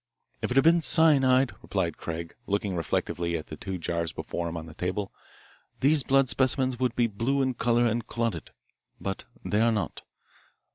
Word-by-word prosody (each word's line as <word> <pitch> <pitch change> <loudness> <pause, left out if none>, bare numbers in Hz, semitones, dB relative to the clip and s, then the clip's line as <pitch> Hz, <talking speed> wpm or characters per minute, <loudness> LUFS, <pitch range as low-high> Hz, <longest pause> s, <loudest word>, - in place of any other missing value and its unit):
"If - - -1
it 125 - 0
had 135 - +6
been 170 +2 +5
cyanide," 135 -6 +4
replied - - -2
Craig, 85 0 -5
looking 100 -1 -1
reflectively 85 0 -1
at 80 - -9
the 75 - -6
two 95 +3 -5
jars 85 -1 -2
before 85 -1 -4
him 85 - -5
on 80 - -6
the 80 - -11
table, 95 +4 -3 0.7
"these 145 +2 +4
blood 135 0 +3
specimens 130 -1 +1
would 125 -2 0
be 120 - +3
blue 115 +6 0
in 130 -1 0
colour 120 0 +2
and 115 -1 0
clotted. 115 -1 -2 0.5
But 95 0 -4 0.2
they 105 +1 +1
are 115 0 +4
not. 105 -6 -2
115 Hz, 180 wpm, -27 LUFS, 90-130 Hz, 0.7 s, had